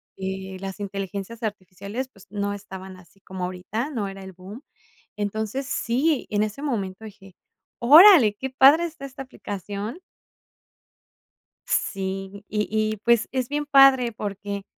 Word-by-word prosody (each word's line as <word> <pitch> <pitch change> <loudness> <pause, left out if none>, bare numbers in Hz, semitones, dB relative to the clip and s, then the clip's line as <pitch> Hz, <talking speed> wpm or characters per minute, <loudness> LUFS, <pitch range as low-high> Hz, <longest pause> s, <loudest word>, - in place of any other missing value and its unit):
y 190 0 -5
las 195 +1 -6
inteligencias 200 +3 -5
artificiales, 205 +4 -5
pues, 195 -6 -19
no 205 0 -2
estaban 190 -2 -9
así 185 +2 -20
como 190 -2 -7
ahorita, 190 +9 -4
no 215 -7 -2
era 195 0 -8
el 190 - -9
boom. 195 - -11 0.5
Entonces 220 +5 -3
sí, 270 +6 0
en 210 0 +1
ese 215 +6 -3
momento 215 -7 -3
dije: 195 -3 -13 0.5
"Órale, 290 - +8
qué 265 +5 -5
padre 275 +6 +6
está 320 -4 -10
esta 270 0 -7
aplicación". 205 - -6 1.7
Sí, 195 +1 -3
y 210 0 -1
y, 215 0 0
pues, 235 +2 +2
es 255 -1 -2
bien 295 0 -2
padre 270 -4 +6
porque 200 -1 -5
210 Hz, 140 wpm, -24 LUFS, 195-255 Hz, 1.7 s, Órale